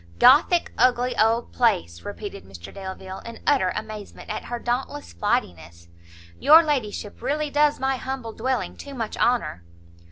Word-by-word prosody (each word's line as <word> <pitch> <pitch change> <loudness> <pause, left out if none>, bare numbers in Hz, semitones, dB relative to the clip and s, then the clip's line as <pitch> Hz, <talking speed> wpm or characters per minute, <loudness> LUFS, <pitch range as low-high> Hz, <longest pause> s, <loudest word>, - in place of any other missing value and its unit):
"Gothic 315 - +5
ugly 250 0 +3
old 225 +2 +1
place!" 85 - +1
repeated - - -7
Mr 90 -2 -11
Delvile, 190 -1 -7
in 230 0 -10
utter 270 -11 +3
amazement 215 0 -7
at - - -5
her 240 - -4
dauntless 240 - -3
flightiness; 85 0 -3 0.5
"your 320 +2 +8
ladyship 240 -9 -3
really 300 0 -1
does 295 0 +3
my 265 0 0
humble 255 -4 -5
dwelling 255 +2 -2
too 280 -1 -9
much 225 -4 -4
honour!" 235 - 0
235 Hz, 140 wpm, -24 LUFS, 190-265 Hz, 0.5 s, your